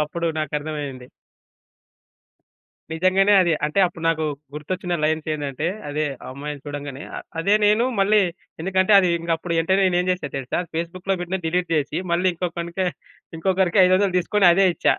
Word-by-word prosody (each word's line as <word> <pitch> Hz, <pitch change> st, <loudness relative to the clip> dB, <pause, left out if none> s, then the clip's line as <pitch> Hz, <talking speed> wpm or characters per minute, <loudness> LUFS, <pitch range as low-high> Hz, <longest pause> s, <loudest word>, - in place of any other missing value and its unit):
అప్పుడు 170 Hz, +3 st, -3 dB
నాకర్థమయ్యింది. 145 Hz, -3 st, -4 dB, 1.9 s
నిజంగానే 185 Hz, +4 st, +3 dB
అది 170 Hz, -, +1 dB
అంటే 150 Hz, +6 st, 0 dB
అప్పుడు 170 Hz, -1 st, -8 dB
నాకు 160 Hz, -1 st, 0 dB, 0.3 s
గుర్తొచ్చిన 175 Hz, +4 st, -3 dB
లైన్స్ 155 Hz, 0 st, 0 dB
ఏందంటే 145 Hz, 0 st, -3 dB, 0.2 s
అదే 150 Hz, +1 st, -1 dB, 0.2 s
ఆ -, -, -8 dB
అమ్మాయిని 145 Hz, +1 st, -7 dB
చూడంగానే 145 Hz, -1 st, -6 dB
ఆహ్, -, -, -6 dB, 0.2 s
అదే 200 Hz, +5 st, +3 dB
నేను 215 Hz, +3 st, +3 dB, 0.2 s
మళ్ళీ 210 Hz, +2 st, +4 dB, 0.4 s
ఎందుకంటే 190 Hz, +3 st, +2 dB
అది 185 Hz, -2 st, +3 dB
ఇంగ 170 Hz, 0 st, -6 dB
అప్పుడు 170 Hz, +1 st, -4 dB
యెంటనే 190 Hz, +4 st, +2 dB
నేను 175 Hz, -1 st, +2 dB
ఏం 180 Hz, -, -2 dB
జేసా 180 Hz, -6 st, -2 dB
దెలుసా? 130 Hz, -2 st, -3 dB, 0.2 s
ఫేస్‌బుక్‌లో 180 Hz, +4 st, -2 dB
పెట్టినది 180 Hz, 0 st, -4 dB
డిలీట్ 175 Hz, 0 st, -1 dB
జేసి, 150 Hz, +1 st, -1 dB
మళ్ళీ 180 Hz, +2 st, +2 dB
ఇంకొకనికి 170 Hz, +1 st, -3 dB, 0.5 s
ఇంకొకరికి 190 Hz, +2 st, +2 dB
500 185 Hz, 0 st, +3 dB
తీసుకొని 190 Hz, +2 st, +2 dB
అదే 195 Hz, +2 st, +4 dB
ఇచ్చా. -, -, +2 dB
170 Hz, 150 wpm, -22 LUFS, 150-185 Hz, 1.9 s, మళ్ళీ